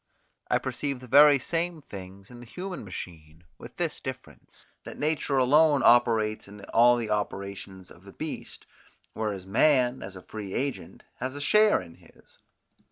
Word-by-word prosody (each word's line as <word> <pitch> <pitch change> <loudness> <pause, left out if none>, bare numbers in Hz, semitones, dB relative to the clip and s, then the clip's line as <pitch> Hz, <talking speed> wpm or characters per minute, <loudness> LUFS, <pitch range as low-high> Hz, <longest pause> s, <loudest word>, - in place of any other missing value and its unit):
I - - +3
perceive 140 -3 -4
the 130 - -12
very 145 +3 +7
same 170 +4 -2
things 95 -1 -11
in 120 - -12
the 120 - -12
human 180 +5 -6
machine, 80 -4 -9 0.2
with - - -12
this - - -2
difference, - - -10 0.2
that - - -9
nature 150 -2 -1
alone 145 +2 +4
operates 110 -3 +3
in 100 0 -12
all 120 +1 +6
the 115 -2 -3
operations 100 -2 -5
of 85 - -17
the 100 - -13
beast, 155 -1 -7 0.5
whereas 105 -4 -4
man, 125 +4 +2
as 95 0 -8
a 95 - -11
free 105 -3 -7
agent, 140 +1 -4
has 130 +2 -4
a - - -6
share 210 +8 +4
in 85 - -15
his. - - -22
120 Hz, 165 wpm, -27 LUFS, 100-145 Hz, 0.5 s, very